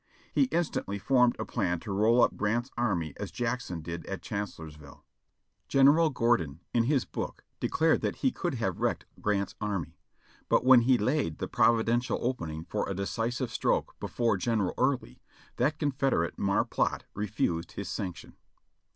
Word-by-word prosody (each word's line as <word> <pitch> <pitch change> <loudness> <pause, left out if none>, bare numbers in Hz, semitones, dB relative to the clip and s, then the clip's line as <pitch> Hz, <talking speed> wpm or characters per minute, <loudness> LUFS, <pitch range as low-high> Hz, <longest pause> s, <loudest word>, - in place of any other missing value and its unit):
He 275 - +4
instantly 170 - -1
formed 125 +3 +3
a - - -3
plan 90 -7 -1
to 105 - -6
roll 110 +5 +4
up - - +2
Grant's 120 +5 -1
army 90 -11 -1
as - - -5
Jackson 115 -8 -3
did 85 +1 -6
at 95 - -5
Chancellorsville. 80 -8 -7 0.6
General 145 +4 +5
Gordon 115 - +1
in 115 -1 +3
his 135 -1 +2
book - - -5 0.2
declared 160 0 +2
that - - -1
he 265 - +1
could 175 - -3
have 95 -7 -2
wrecked - - 0 0.2
Grant's 100 -2 0
army, 100 -6 -3 0.5
but - - +3
when 130 -2 +8
he 125 +2 +4
laid 120 - 0
the - - -3
providential 120 +1 +2
opening 80 -11 -3
for 105 - -2
a 100 - -2
decisive 115 +5 -2
stroke - - 0
be - - -4
fore 115 -4 +1
General 105 0 0
Early, 130 0 -1 0.4
that 140 +6 +1
Confederate 135 - 0
mar 100 0 +2
plot - - -1
refused 100 -5 -2
his - - -5
sanction. 90 -3 -5
115 Hz, 160 wpm, -29 LUFS, 95-125 Hz, 0.6 s, when